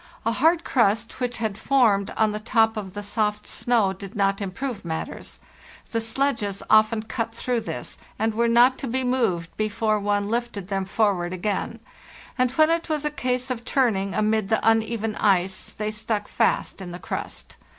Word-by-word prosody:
A 230 - +2
hard 325 +8 +3
crust 225 -1 +1
which 245 -1 -2
had 220 -2 -2
formed 220 -8 +3
on 220 -1 +3
the 210 - -3
top 225 0 +2
of 195 -3 -6
the 205 - -4
soft 210 0 -1
snow 225 -6 +1
did 195 +2 -10
not 195 0 +1
improve 225 +4 -4
matters; 160 -2 -5 0.5
the 230 - 0
sledges 225 -4 -1
often 215 0 +5
cut 225 0 -3
through 240 0 -1
this, - - -6 0.2
and 220 0 0
were 235 +2 +2
not 240 +3 +5
to 270 - -3
be 260 +2 -1
moved 230 -10 0
before 215 0 0
one 205 0 0
lifted 225 -4 -3
them 195 -1 -1
forward 190 -4 +1
again, 200 +3 -2 0.6
and 255 -1 +2
when 310 +3 +4
it 335 0 -1
was 305 -1 -1
a 300 - 0
case 255 -2 -1
of 240 -2 -3
turning 215 -8 +1
amid 215 -1 +1
the 220 0 +1
uneven 225 -1 +1
ice 190 -2 +1
they 215 0 -3
stuck 215 -1 -2
fast - - 0
in 180 -2 -7
the 175 - -6
crust. - - -6
220 Hz, 180 wpm, -24 LUFS, 200-240 Hz, 0.6 s, often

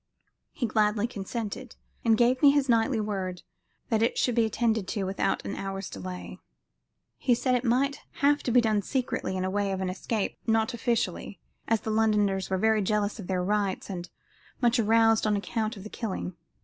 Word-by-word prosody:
He 245 - -2
gladly 215 -1 +2
consented, 230 +2 -5 0.3
and 225 -2 +4
gave 245 +2 +3
me 285 - +8
his 280 -1 +3
knightly 230 0 +2
word 190 -4 -3 0.5
that 220 -2 +2
it 230 - +1
should 245 - +2
be 230 -1 +3
attended 220 -2 0
to 205 -1 -2
without 195 +1 -1
an - - -3
hour's 195 0 -5
delay. 180 -1 -7 0.8
He 245 - +3
said 255 +2 0
it 250 -1 +1
might 265 +4 +1
have 290 +1 +2
to 245 - -2
be 245 +1 +6
done 215 -3 +1
secretly 245 -4 -2
in 185 - -1
the 185 - 0
way 200 0 0
of 190 - -2
an 185 -1 -1
escape 205 +2 -3
not 225 +2 +2
officially 225 -5 -2 0.3
as 225 -1 +2
the 220 - -3
Londoners 210 -3 +2
were 190 - +1
very 220 +2 +3
jealous 210 +2 0
of 190 - -7
their 185 -1 0
rights 200 0 -1
and 175 -2 -6 0.5
much 240 0 +3
aroused 225 0 +4
on 210 - +2
account 220 +2 -2
of 195 - -9
the 215 - -8
killing. 190 -5 -4
220 Hz, 190 wpm, -28 LUFS, 195-235 Hz, 0.8 s, me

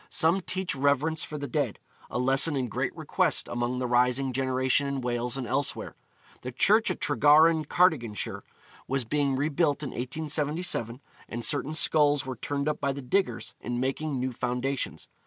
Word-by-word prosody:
Some 170 +4 +2
teach 185 +1 -2
reverence 145 +3 +1
for 150 - -5
the 145 - -4
dead, 125 - -1 0.3
a - - -3
lesson 135 +5 +3
in 130 -3 -1
great - - -3
request - - +1
among 120 +1 -2
the 125 - -2
rising 125 +2 +2
generation 130 +2 +1
in 140 -1 -2
Wales 120 +1 -2
and 130 - -3
elsewhere. 135 +3 -2 0.5
The 125 - -5
church 215 - +4
at - - -3
Tregaron, 155 +4 +4
Cardiganshire, 135 - +1 0.5
was 135 -2 -1
being 140 +2 0
rebuilt 150 +1 0
in 140 - -3
1877, 145 -1 -2 0.3
and 120 0 -3
certain 150 +1 -1
skulls 145 -3 +3
were 130 -1 -4
turned 140 +2 -3
up 150 - -1
by 140 -1 0
the 140 0 -7
diggers 190 +10 -1
in 120 0 -3
making 135 +2 -2
new 130 +1 -1
foundations. 125 +2 -3
140 Hz, 165 wpm, -27 LUFS, 125-150 Hz, 0.5 s, church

